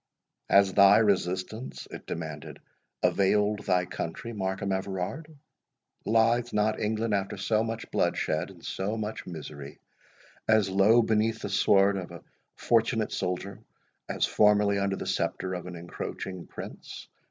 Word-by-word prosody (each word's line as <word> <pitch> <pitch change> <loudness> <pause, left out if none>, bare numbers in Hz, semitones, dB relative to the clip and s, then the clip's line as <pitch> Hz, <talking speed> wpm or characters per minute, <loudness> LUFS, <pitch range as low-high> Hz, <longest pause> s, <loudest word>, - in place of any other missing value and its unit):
"Has 100 -1 +5
thy 100 0 +7
resistance," 100 +2 -1
it - - -9
demanded, 80 -3 -6 0.5
"availed 105 +1 +2
thy 90 -1 +2
country, 100 +8 -5
Markham 95 -1 -2
Everard? 95 - -4 0.7
Lies 115 +2 +3
not 105 +1 +1
England, 110 +1 -1
after 100 0 -1
so 110 +3 +1
much 115 0 -5
bloodshed, 80 +3 0
and 90 -4 -14
so 100 +4 -2
much 110 0 -5
misery, 75 -4 -8 0.7
as 110 -3 +3
low 105 +5 +5
beneath 110 +1 0
the - - -3
sword 100 0 +4
of 90 -2 -5
a 85 -1 -11 0.3
fortunate 115 -1 +1
soldier, 95 +1 -3 0.5
as - - +1
formerly 105 -1 +3
under 100 0 0
the - - -6
sceptre 95 0 -2
of 90 0 -5
an 90 - -7
encroaching 85 +1 -6
prince? - - -9
100 Hz, 135 wpm, -28 LUFS, 95-110 Hz, 0.7 s, thy